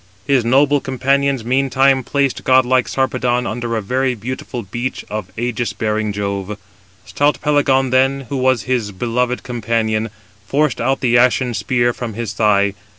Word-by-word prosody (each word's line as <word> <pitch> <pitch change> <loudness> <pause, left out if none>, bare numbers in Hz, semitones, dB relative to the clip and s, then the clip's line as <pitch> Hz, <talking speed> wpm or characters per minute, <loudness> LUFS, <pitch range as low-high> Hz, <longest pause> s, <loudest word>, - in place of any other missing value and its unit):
His 135 -3 +2
noble 140 +4 +3
companions 135 -1 0
meantime 135 +1 +2
placed 140 +1 -1
godlike 130 -1 +3
Sarpedon 125 -2 0
under 120 +1 -3
a 110 - -2
very 130 +4 0
beautiful 120 +1 -6
beech 120 +6 -5
of 105 -3 -4
ægis 120 0 -2
bearing 110 -1 -1
Jove. 100 0 -4 0.5
Stout 145 +1 +1
Pelagon 135 -3 +2
then, 135 +1 +2
who 140 - -2
was 130 -4 +2
his 115 -3 -1
beloved 125 +5 -1
companion, 115 -2 -1 0.4
forced 145 +1 0
out 135 +3 0
the 120 -1 +3
ashen 125 0 +2
spear 120 +1 0
from 115 -4 -6
his 115 -1 -4
thigh. 100 -2 +2
125 Hz, 150 wpm, -18 LUFS, 115-130 Hz, 0.5 s, noble